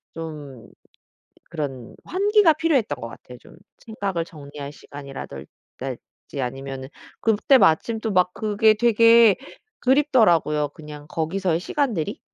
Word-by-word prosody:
좀 150 -7 -8 0.8
그런 140 -7 -6
환기가 400 -3 +3
필요했던 310 - 0
것 115 - -5
같아요. 125 +1 -12
좀 - - -18 0.2
생각을 200 -7 -4
정리할 145 -3 -10
시간이라든지 135 - -9
아니면은 135 +1 -5 0.3
그때 225 +5 +3
마침 220 +4 +2
또 220 - -2
막 180 -2 +2
그게 215 0 +3
되게 230 -1 +5 0.4
그립더라고요. 215 - +3
그냥 150 -1 -11
거기서의 165 +2 -1
시간들이 225 - -2
170 Hz, 275 characters per minute, -23 LUFS, 145-230 Hz, 0.8 s, 되게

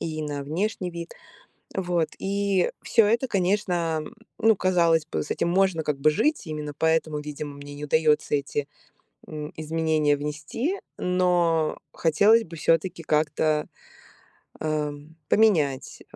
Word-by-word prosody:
и 155 -1 -3
на 145 -2 -4
внешний 180 +5 -2
вид. 170 0 -7 0.6
Вот. 175 -4 0
И 200 -1 0
всё 225 -3 +4
это, 235 +5 +1
конечно, 180 -5 0
м, - - -11 0.3
ну, 225 0 +5
казалось 170 -4 +3
бы, 155 - -3
с - - -8
этим - - 0
можно 185 -2 +2
как 150 -2 -1
бы 155 - +5
жить, 295 - +1
именно 150 -1 -5
поэтому 160 -1 +1
видимо 150 -1 -6
мне 145 0 -10
не 145 +1 -6
удается 150 0 +2
эти, 140 0 -2 0.6
м, 150 -1 -7
изменения 155 -1 +1
внести, 155 - -3 0.2
но 175 -3 +1 0.2
хотелось 205 +8 +4
бы 165 - -11
всё-таки 165 +2 +1
как-то, 155 0 +1 0.9
а, 155 -1 -1 0.4
поменять 155 - +2
160 Hz, 135 wpm, -25 LUFS, 150-185 Hz, 0.9 s, ну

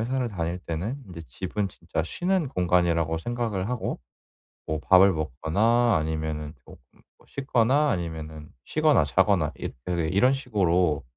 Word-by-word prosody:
회사를 125 +1 -1
다닐 85 -3 -3
때는 90 - -4
인제 85 -3 -9
집은 95 - -3
진짜 80 - -4
쉬는 180 - -1
공간이라고 85 - +1
생각을 110 -1 -3
하고 125 -2 -3 0.7
뭐 80 -1 -1
밥을 95 +4 +6
먹거나 85 - +1
아니면은 80 -1 -3
쪼끔 - - -15 0.4
뭐 - - -24
씻거나 135 +2 +1
아니면은 80 -3 -5 0.2
쉬거나 155 - +3
자거나 70 - +2
있 - - -5
그 85 -2 -1
이런 125 +8 +4
식으로 90 - +1
90 Hz, 310 characters per minute, -26 LUFS, 80-120 Hz, 0.7 s, 밥을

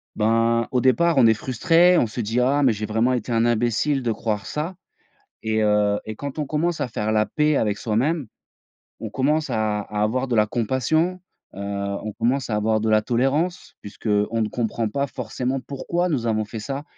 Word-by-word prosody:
ben, 115 +1 +2
au 125 - +2
départ, 165 +4 +3
on 125 - +6
est 110 - +6
frustré, 170 - +3
on - - +3
se 115 +2 -4
dit: 115 +3 -1
«Ah 135 +4 +2
mais 130 - +5
j'ai 105 +1 -4
vraiment 115 +4 +1
été 120 -1 -3
un 115 0 +2
imbécile 120 +4 +1
de 115 - 0
croire 105 -2 -2
ça» 160 +5 -4 0.7
et 110 0 0
heu, 105 -1 +2
et 110 - -6
quand 140 +6 -7
on 150 - -1
commence 165 +3 -1
à - - 0
faire 110 -2 -2
la 105 0 +2
paix 150 -1 +1
avec 105 -2 +1
soi-même, 130 +4 0 0.7
on - - -5
commence 150 +2 0
à 110 -3 0
à 105 0 -3
avoir 130 +4 -1
de 120 - 0
la 105 0 +4
compassion, 130 - 0 0.4
heu, - - -7
on 100 +1 -4
commence 125 +5 0
à 105 - 0
avoir 110 +1 +1
de 110 - -1
la 110 0 +4
tolérance 135 +10 -1
puisqu'on 105 +2 -1
ne 105 - -1
comprend 115 0 -2
pas 140 +4 -2
forcément 125 +2 -3
pourquoi 170 +7 -2
nous 120 -7 -1
avons 110 -1 0
fait 110 +1 -7
ça, 135 +7 -5
115 Hz, 200 wpm, -23 LUFS, 110-140 Hz, 0.7 s, on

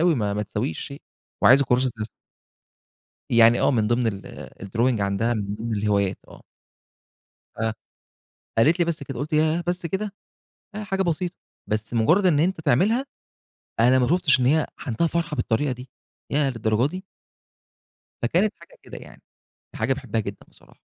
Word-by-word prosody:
أوي، 170 0 +4
ما 105 -6 -1
ما 105 - -1
تساويش 80 -5 -3
شيء 140 +1 -8 0.4
وعايزه 140 +3 +7
كراسة 125 +1 +2
رسم. 110 - -3 1.2
يعني 115 0 +6
آه - - +4
من 115 -6 +1
ضمن 120 +2 +1
ال 100 -3 -6
الDrawing 115 +4 0
عندها، 100 +4 0
من 100 -2 -3
ضمن 115 +2 -4
الهوايات 100 -2 +1
آه. - - -14 1.2
آه، 110 0 -1 0.8
قالت 155 +10 +4
لي: 175 - +3
"بس 170 -2 -3
كده." 135 -1 -6
قُلت: 150 +3 -4
"ياه 155 +2 +2
بس 175 0 -1
كده؟!" 195 +4 -3 0.6
أهي 210 0 -5
حاجة 195 -1 -1
بسيطة، 175 0 -1 0.3
بس 110 +2 -2
مجرّد 160 - +3
إن 160 -6 +4
أنت 170 +1 +1
تعملها، 210 - +2 0.8
أنا 125 +3 +5
ما 125 -1 +2
شُفتش 160 -4 +3
إن 125 - +2
هي 155 +4 +3
عندها 125 +6 -1
فرحة 165 -1 -2
بالطريقة 125 +3 0
دي، 125 +1 -9 0.4
ياه 145 -1 +2
للدرجة 115 +1 +1
دي! 185 +3 -7 1.2
فكانت 180 - +2
حاجة 170 - -17
كده - - -10
يعني، - - -15 0.5
حاجة 115 +4 0
باحبها 125 -5 -3
جدًا 100 -1 -7
بصراحة. - - -20
130 Hz, 160 wpm, -24 LUFS, 115-170 Hz, 1.2 s, وعايزه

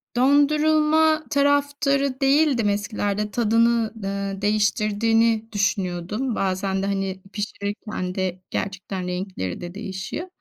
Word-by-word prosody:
dondurulma 305 +3 +4
taraftarı 280 -1 +1
değildim 270 -5 +3
eskilerde. 205 0 -2
Tadını, 230 0 +2
eee, 195 0 -3
değiştirdiğini 215 +2 +2
düşünüyordum. 200 +3 -1
Bazen 190 0 -1
de, - - 0
hani, 195 -1 -2
pişirirken 205 -2 -4
de 185 -1 -2
gerçekten 190 -1 -4
renkleri 180 - -4
de 175 0 -7
değişiyor. 200 - -5
210 Hz, 100 wpm, -23 LUFS, 195-270 Hz, -, dondurulma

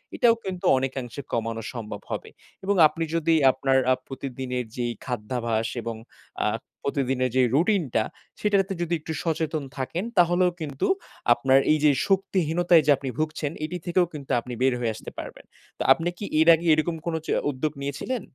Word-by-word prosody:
এটাও 235 -2 +5
কিন্তু 185 -2 -5
অনেকাংশে 130 -1 -3
কমানো 115 0 -2
সম্ভব 105 -4 -6
হবে। - - -4 0.3
এবং 200 +1 +1
আপনি 165 +2 -4
যদি 165 0 +2 0.2
আপনার 135 0 +1
আ - - +7
প্রতিদিনের 130 -2 -4
যেই 120 -1 -1
খাদ্যাভ্যাস 115 -1 -2
এবং 115 0 -4 0.5
আ - - +3 0.4
প্রতিদিনের 130 -3 0
যে 130 - +5
রুটিনটা 160 - +2 0.4
সেটাতে 200 -2 +2
যদি 170 0 -1
একটু 160 +1 -5
সচেতন 160 -2 -1
থাকেন 150 +7 -2
তাহলেও 175 +1 +4
কিন্তু 145 -3 -2 0.5
আপনার 130 +3 +4
এই 155 - +4
যে 150 - +7 0.2
শক্তিহীনতায় 175 -3 +3
যে 150 - +5
আপনি 135 0 -5
ভুগছেন 155 -1 -1
এটি 175 +3 -4
থেকেও 180 0 +3
কিন্তু 145 -3 -7
আপনি 125 +1 -7
বের 130 0 +4
হয়ে 115 -2 -1
আসতে - - -9
পারবেন। - - -8 0.3
তো - - -2
আপনি 170 +3 -2
কি 205 - -5
এর 160 - +4
আগে 165 +2 -7
এরকম 155 +2 +1
কোন 170 - -1
চ - - -12 0.2
উদ্যোগ 145 +3 -2
নিয়েছিলেন? 145 - -3
145 Hz, 165 wpm, -25 LUFS, 125-170 Hz, 0.5 s, আ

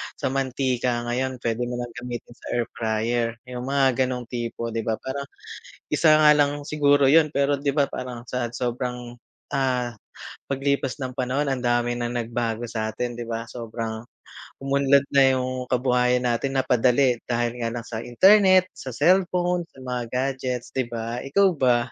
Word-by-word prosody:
sa - - -2
mantika 130 -2 -1
ngayon 130 +2 -2
pwede 115 0 -1
mo 125 - -4
ng 120 - -8
gamitin 120 -1 -7
sa - - -16
air 120 - +2
fryer, 115 +1 -1
yung 125 0 -7
mga 135 -2 +2
ganong 125 -1 -3
tipo 115 -1 -4
di 115 - -2
ba 110 - +1
parang 140 +3 -5 0.7
isa 160 - +4
nga 150 -1 +7
lang 145 0 +1
siguro 145 -2 +3
yun 155 +1 +5
pero 140 -1 +1
di 140 0 0
ba 140 0 +2
parang 125 -2 -7
sa 120 -2 -2
sobrang, 125 0 -4 0.4
ah, 125 -3 0 0.5
paglipas 140 -1 -1
ng 130 - -3
panahon 135 +3 0
ang 130 - -1
dami 120 0 0
ng 120 0 -3
nagbago 115 0 -2
sa 110 -2 -2
atin 120 0 -3
di 120 - -5
ba 115 0 -3
sobrang 115 -1 -6 0.6
umunlad 140 0 +3
na 135 -1 +5
yung 130 0 -3
kabuhayan 125 0 +2
natin 125 +3 -1
napadali 125 -1 +3
dahil 120 0 -1
nga 115 - -1
lang 120 - -4
sa 110 -1 -6
internet, 185 - +5
sa 130 -3 -8
cellphone 180 +1 +2
sa 130 -5 -15
mga 125 -1 -3
gadgets 130 -2 -2
di 130 -3 -1
ba 115 +1 -4
ikaw 190 +8 +3
ba? 130 -6 +3
125 Hz, 165 wpm, -24 LUFS, 120-140 Hz, 0.7 s, nga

